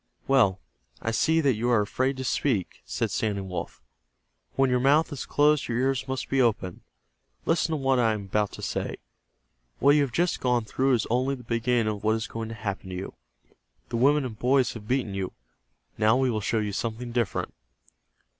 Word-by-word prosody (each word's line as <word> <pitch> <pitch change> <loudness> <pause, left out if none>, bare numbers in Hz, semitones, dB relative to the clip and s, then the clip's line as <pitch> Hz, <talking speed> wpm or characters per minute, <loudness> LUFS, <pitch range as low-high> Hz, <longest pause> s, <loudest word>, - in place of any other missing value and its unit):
"Well, 115 -9 +4 0.4
I 115 - -2
see 160 +8 +2
that 140 -4 +3
you 120 +3 -1
are 120 -3 +4
afraid 130 +6 -1
to 130 - -4
speak," 125 -7 -1
said - - -2
Standing 100 -3 -1
Wolf. 90 -1 -6 0.7
"When 135 -1 +3
your 125 - +3
mouth 145 +5 +3
is 140 - -6
closed 150 -1 +3
your 120 - -1
ears 130 0 0
must 130 0 -3
be 135 -1 +2
open. 105 -7 0 0.6
Listen 165 0 +1
to - - +1
what 135 -3 +1
I 115 -2 +3
am 105 -2 -4
about 105 +1 0
to - - -9
say. - - -2 0.8
What 140 - +5
you 150 - +4
have 140 -3 0
just 175 +8 +1
gone 125 -3 +1
through 130 +4 +1
is 115 -3 +1
only 130 +3 +1
the 125 - -12
beginning 115 -1 +1
of 105 - -9
what 110 +1 +3
is 115 0 -2
going 115 0 -5
to 115 - -6
happen 100 -3 -5
to 90 - -5
you. 95 +2 -6 0.8
The 115 - -2
women 140 +3 +4
and 110 -3 -7
boys 130 0 +2
have 105 -2 -10
beaten 125 -5 0
you. 95 -2 -3 0.7
Now 110 +3 +4
we 130 -1 +2
will 110 -2 -1
show 110 +3 0
you 105 -1 -1
something 115 +3 -4
different." 115 -5 -1
120 Hz, 200 wpm, -26 LUFS, 110-135 Hz, 0.8 s, What